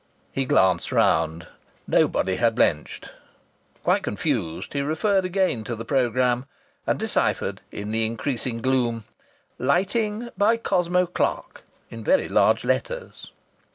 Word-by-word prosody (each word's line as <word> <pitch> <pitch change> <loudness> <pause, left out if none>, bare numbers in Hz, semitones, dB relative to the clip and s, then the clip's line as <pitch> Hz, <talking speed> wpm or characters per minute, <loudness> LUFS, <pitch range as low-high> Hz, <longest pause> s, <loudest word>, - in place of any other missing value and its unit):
He 135 - -1
glanced 95 -6 +2
round. 80 +1 +2 0.4
Nobody 95 -1 +2
had 115 -1 +2
blenched. 75 -10 0 0.7
Quite - - +2
confused, 80 0 -2
he 140 - 0
referred 185 +7 +1
again 185 - 0
to 120 - -3
the 115 +1 -7
programme 125 0 +1 0.4
and - - +1
deciphered - - -1
in 105 +1 -5
the 110 0 0
increasing 115 +1 -3
gloom: 120 -3 +1 0.6
"Lighting 210 - 0
by 210 +4 +3
Cosmo 180 -4 +1
Clark," 175 - -2 0.3
in - - -8
very - - +2
large - - +3
letters. - - -3
130 Hz, 120 wpm, -24 LUFS, 115-185 Hz, 0.7 s, by